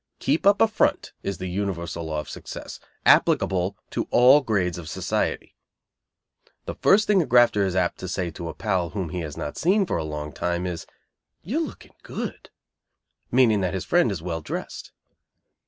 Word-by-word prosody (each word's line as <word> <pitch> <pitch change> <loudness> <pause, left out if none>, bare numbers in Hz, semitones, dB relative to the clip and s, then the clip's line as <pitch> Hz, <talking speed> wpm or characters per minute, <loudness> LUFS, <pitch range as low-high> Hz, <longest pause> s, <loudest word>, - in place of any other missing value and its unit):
Keep 165 - +1
up 200 0 +5
a 225 - +7
"front" 220 - 0
is 100 -2 -3
the 95 - -6
universal 90 -3 -3
law 80 -1 -2
of - - -13
success, - - -8 0.3
applicable 95 +1 +3
to - - -2
all 130 +4 +6
grades 95 - -1
of 80 -3 -8
society. - - -2 1.1
The - - -4
first 210 +2 +4
thing 200 -3 +4
a - - -1
grafter 120 -4 +5
is 95 - -3
apt 90 -2 0
to 95 - -5
say 90 -2 -2
to 85 0 -6
a - - -7
pal 95 -5 -1
whom 95 -4 -4
he 90 - -4
has 75 -4 -6
not 75 - -5
seen 195 +4 +3
for - - -1
a 80 - -2
long 75 -1 -5
time 90 +1 -2
is, 90 -3 -5 0.6
"You 240 - -1
are 330 - -1
looking - - -13
good," - - -6 0.8
meaning 115 -5 +4
that 90 0 -1
his 95 - -3
friend 175 -10 +3
is 85 -5 -5
well 85 -2 -3
dressed. - - -6
95 Hz, 190 wpm, -24 LUFS, 85-125 Hz, 1.1 s, a